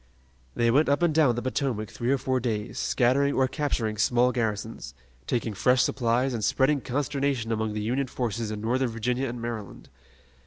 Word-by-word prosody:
They 115 0 +2
went 145 +4 +3
up 140 +5 +2
and 170 -3 +3
down 150 -6 +4
the 120 - -3
Potomac 125 -5 -2
three 120 +2 -2
or 140 - +3
four 130 0 0
days, 110 -2 -3
scattering 140 +3 +2
or 130 0 +3
capturing 125 -7 -2
small 120 +3 +3
garrisons, 110 - -3 0.3
taking 115 -2 -1
fresh 125 +5 +3
supplies 125 +1 +1
and 115 -3 -3
spreading 135 +4 +2
consternation 135 -3 -1
among 110 -1 -1
the 105 - -3
Union 130 +5 0
forces 115 -3 -3
in 105 -1 -5
Northern 125 +3 0
Virginia 125 +3 -1
and 120 0 -6
Maryland. 115 -3 -6
120 Hz, 180 wpm, -26 LUFS, 115-135 Hz, 0.3 s, down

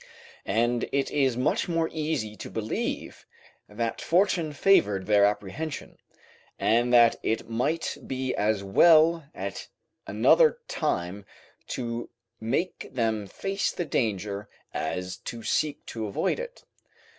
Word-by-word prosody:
And 120 +3 +1
it 140 -1 0
is 135 -4 +2
much 130 +7 +1
more 165 -1 +1
easy 150 -9 -2
to - - -7
believe 110 -1 -4 0.4
that 115 +2 -3
fortune 170 -3 +2
favoured 105 - +3
their 105 -1 +5
apprehension, 105 +10 -3 0.6
and 120 +2 +2
that 120 -1 +6
it 110 - -1
might 125 +9 -1
be 130 -1 -2
as 105 -1 0
well 160 - +5
at - - -5 0.4
another 480 -1 +4
time 100 - -2 0.4
to 120 -1 -4 0.3
make 135 +11 -2
them 110 -4 -1
face 195 - -2
the 175 - -3
danger, 105 - -2 0.2
as 90 +4 -3
to 115 -1 -7
seek 150 +4 -1
to 110 -2 -4
avoid 100 - -1
it. - - -8
120 Hz, 120 wpm, -27 LUFS, 105-155 Hz, 0.6 s, that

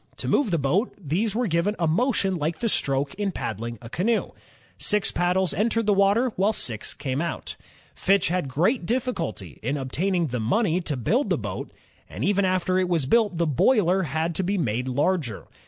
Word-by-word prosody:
To - - -5
move 285 - +2
the 170 - +1
boat, 155 - 0
these 195 +5 -1
were 245 +2 +1
given 180 +2 +1
a 170 - +1
motion 195 +1 +1
like 160 +1 -2
the 230 - -1
stroke 140 -4 0
in 200 -2 0
paddling 115 - -4
a - - -7
canoe. 205 - 0 0.5
Six 210 -1 +2
paddles 180 0 +1
entered 230 +3 +1
the 210 - +4
water, 200 +6 +3
while 200 +4 +2
six 110 - -3
came 135 +1 -2
out. 170 -1 -3 0.4
Fitch 195 -2 +2
had 180 -4 -1
great 170 - +1
difficulty 170 - -3
in 135 +6 -1
obtaining 165 +6 -1
the 125 0 -2
money 180 - +1
to 150 -5 -3
build 240 - +1
the - - +2
boat, - - -5 0.4
and - - -4
even 200 -1 +2
after 185 0 +1
it 185 -1 0
was 165 -6 +1
built 205 - +2
the 170 - +2
boiler 185 - +3
had 160 +1 -1
to 190 - -1
be 200 +3 0
made 125 - -1
larger. 140 - -1
180 Hz, 190 wpm, -25 LUFS, 145-205 Hz, 0.5 s, the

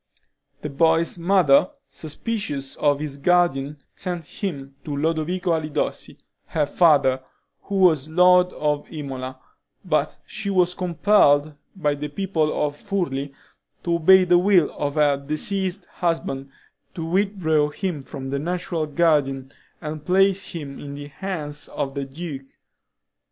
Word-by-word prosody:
The 150 - -3
boy's 165 +3 +2
mother, 175 -3 +4 0.2
suspicious 155 - -4
of 145 -1 +2
his 145 -2 -4
guardian, 150 -3 +2 0.2
sent 175 -3 -5
him 140 -6 -5
to 145 -2 -4
Lodovico 165 +4 0
Alidossi, 155 -2 -2 0.3
her 150 -2 0
father, 140 -5 +3 0.4
who 200 - -4
was 160 -7 +3
lord 180 +2 +5
of 150 -1 -2
Imola, 130 -4 -6 0.5
but - - 0
she 215 -4 -5
was 180 -2 +2
compelled 170 -5 +3 0.2
by 150 -6 0
the 145 +1 -4
people 155 -2 0
of 145 -1 -3
Furli 145 -8 -3 0.5
to 170 - 0
obey 185 +3 +6
the 175 -1 +4
will 180 -4 +4
of 145 0 -2
her 145 -2 +3
deceased 185 +7 -2
husband, 150 -6 -2 0.5
to 165 - -4
withdraw 170 -5 +1
him 170 -1 -3
from 135 0 -7
the 140 - -1
natural 170 0 -2
guardian, 145 -4 +1 0.3
and 155 0 -6
place 195 +2 +2
him 145 -5 -7
in 140 -1 -7
the 145 0 -8
hands 150 -4 -4
of 135 -1 -4
the 140 -1 -3
duke. 135 -1 -7
155 Hz, 135 wpm, -23 LUFS, 145-180 Hz, 0.5 s, obey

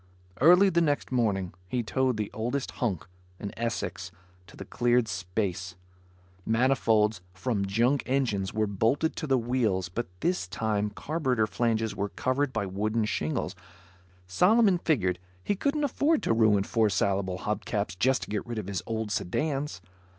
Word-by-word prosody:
Early 180 +6 +7
the 170 -2 +2
next 145 -5 0
morning, 100 -8 0
he 120 +5 -1
towed 130 +1 0
the 105 -2 -3
oldest 125 +5 -2
hulk, 105 - -2 0.3
an 100 - -5
Essex, 100 -6 -3 0.4
to - - -15
the 100 - -7
cleared 120 +2 +2
space. 90 -2 -3 0.7
Manifolds 110 -3 +2
from 100 0 -1
junk 120 +8 +2
engines 115 -8 0
were 110 0 +1
bolted 115 +10 +1
to 155 - -3
the 135 -1 +3
wheels 115 -7 0
but 120 +7 -3
this 175 - 0
time 105 +2 -1
carburetor 130 -1 0
flanges 110 0 0
were 100 +1 -2
covered 130 +5 0
by 110 -5 -1
wooden 105 +4 -1
shingles 80 -7 -2
because - - -24 0.6
Solomon 185 - +4
figured 95 - +1 0.2
he 205 - 0
couldn't 285 +8 0
afford 290 +3 +1
to - - +2
ruin 110 -3 +4
four 110 0 +2
salable 95 -1 0
hub - - -3
caps 85 - -2
just 130 +8 +1
to - - -9
get 105 +2 -2
rid 120 -1 -4
of 105 - -3
his 100 -1 -3
old 110 -2 -2
sedans. 140 - -2
110 Hz, 160 wpm, -28 LUFS, 100-130 Hz, 0.7 s, Early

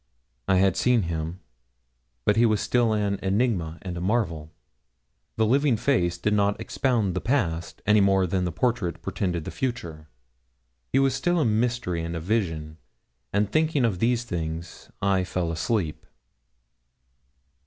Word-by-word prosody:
I 95 - +4
had 95 0 +3
seen 125 -4 +3
him; 85 +2 -4 0.8
but 105 - +4
he 115 +1 +5
was 110 -2 +2
still 120 -1 +2
an 100 -2 0
enigma 95 -5 0
and 90 -2 -5
a 85 - -4
marvel. 90 -7 -1 0.8
The 110 - +2
living 135 +1 +3
face 105 -9 +1
did 105 +5 0
not 100 0 +2
expound 115 -8 0
the 90 - -2
past, 85 - -1
any 105 -1 +5
more 95 -1 +3
than 90 +1 0
the 90 - -1
portrait 90 -10 -1
portended 90 -4 -2
the - - -5
future. 85 -12 -4 0.8
He - - +2
was 135 -1 +3
still 175 +5 +1
a 155 - +2
mystery 110 -6 0
and 85 +1 -4
a - - -2
vision; 80 -5 -2 0.5
and 100 0 +1
thinking 155 -4 +2
of 100 -6 -1
these 120 +2 +2
things 85 -4 -5
I 95 -2 +2
fell 90 -2 -2
asleep. 85 0 -1
100 Hz, 155 wpm, -25 LUFS, 85-115 Hz, 0.8 s, he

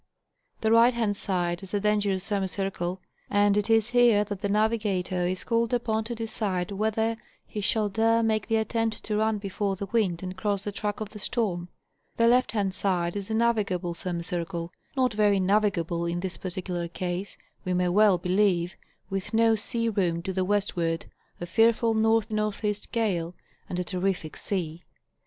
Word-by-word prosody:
The 220 - +2
right 235 +2 +6
hand 220 -3 0
side 175 -3 -1
is 195 - -9
the 205 - 0
dangerous 205 -2 +1
semicircle, 195 -2 -2 0.3
and 205 0 +3
it 210 +1 0
is 225 0 +4
here 240 -4 +5
that 205 -2 -6
the 200 - -1
navigator 205 -4 +1
is 185 +1 -3
called 230 0 +1
upon 220 -2 -1
to 235 +1 -4
decide 210 -4 -2
whether 220 +2 0 0.3
he 210 - -5
shall 215 +1 +1
dare 225 +3 +2
make 220 -2 +1
the 225 - +1
attempt 225 0 -1
to 210 -1 -1
run 220 0 +2
before 200 0 -2
the 200 - -4
wind 195 -5 0
and 185 0 -5
cross 200 0 -1
the 205 - -3
track 205 +1 -3
of 215 - -4
the 210 - -9
storm; 190 -5 -2 0.5
the 230 - +4
left 250 +1 +3
hand 200 -3 0
side 180 -3 0
is 200 -1 -3
the 220 - -2
navigable 205 -7 +1
semicircle,—not 175 +7 -3
very 205 -2 +3
navigable 185 -4 +1
in 175 +1 -2
this 190 -1 -3
particular 180 -1 -4
case, 180 +2 -4 0.3
we 185 - -2
may 180 0 +2
well 205 0 +5
believe, 180 -1 +1 0.4
with 195 +3 -3
no 225 0 +5
sea 230 +2 -2
room 180 -6 0
to 190 - -3
the 185 0 0
westward, 180 -4 0 0.3
a 175 - -4
fearful 225 +5 +3
N 220 0 +2
NE. 210 0 -1 0.2
gale, 180 -7 -1 0.3
and 180 - -3
a 180 - 0
terrific 180 -3 -2
sea. 175 -4 -3
205 Hz, 175 wpm, -27 LUFS, 180-220 Hz, 0.5 s, right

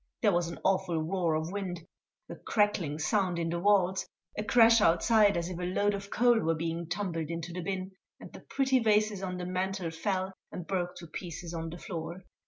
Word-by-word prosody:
There 210 - +5
was 175 -1 +1
an 170 - -6
awful 185 -3 +1
roar 165 0 0
of 160 +2 -2
wind, 180 -4 -4 0.4
a - - -7
crackling 205 -8 0
sound 185 +2 +1
in 165 -1 -1
the 170 - -1
walls, 190 -1 +3 0.3
a 210 - -2
crash 230 0 +6
outside 205 +4 +4
as 170 0 -1
if 180 -1 -5
a 180 0 -2
load 205 +1 +2
of 200 0 -5
coal 240 +1 +4
were 165 -5 +1
being 165 +1 -3
tumbled 170 -4 -2
into 170 0 -4
the 180 - -4
bin, 190 +1 -3 0.3
and - - -12
the - - -9
pretty 265 -1 +1
vases 215 -3 +2
on 185 -1 -3
the 180 - -4
mantel 185 -1 -2
fell 190 +3 -2 0.2
and 180 - -6
broke 180 -1 -2
to 175 -1 -9
pieces 170 0 -7
on 165 -1 -4
the 170 - -7
floor. 170 +1 -6
180 Hz, 205 wpm, -30 LUFS, 170-200 Hz, 0.4 s, crash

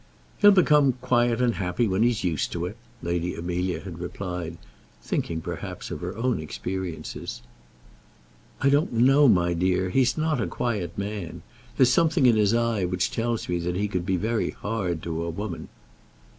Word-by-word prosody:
"He'll 205 - +8
become 150 -8 +5
quiet 120 -1 +1
and 120 -2 +3
happy 95 +4 0
when 95 +1 0
he's 120 -1 +2
used 85 -5 -1
to 85 0 -2
it," 95 +4 -5 0.3
Lady 85 +1 -1
Amelia 90 0 -2
had 85 -1 -8
replied, 90 -2 -5 0.4
thinking, 80 -1 -2
perhaps, - - -6
of - - -5
her 90 +4 -5
own 125 -2 0
experiences. 85 +1 -5 1.2
"I 135 - +4
don't 145 0 +2
know, 135 +5 +5
my 85 -6 +4
dear; 90 +1 +1
he's 125 0 +2
not 155 -4 0
a - - -1
quiet 100 -8 -3
man. 100 -4 -5 0.3
There's 125 -2 +5
something 165 -1 +3
in 120 -2 +6
his 105 +1 +3
eye 115 -4 +1
which 90 0 0
tells 115 0 -2
me 90 -1 -1
that 90 +1 -2
he 100 +3 0
could 90 -3 -3
be 95 - +2
very 110 +4 0
hard 95 -7 -3
to 85 -1 -3
a 85 - -3
woman." 90 +1 -5
100 Hz, 170 wpm, -25 LUFS, 90-120 Hz, 1.2 s, He'll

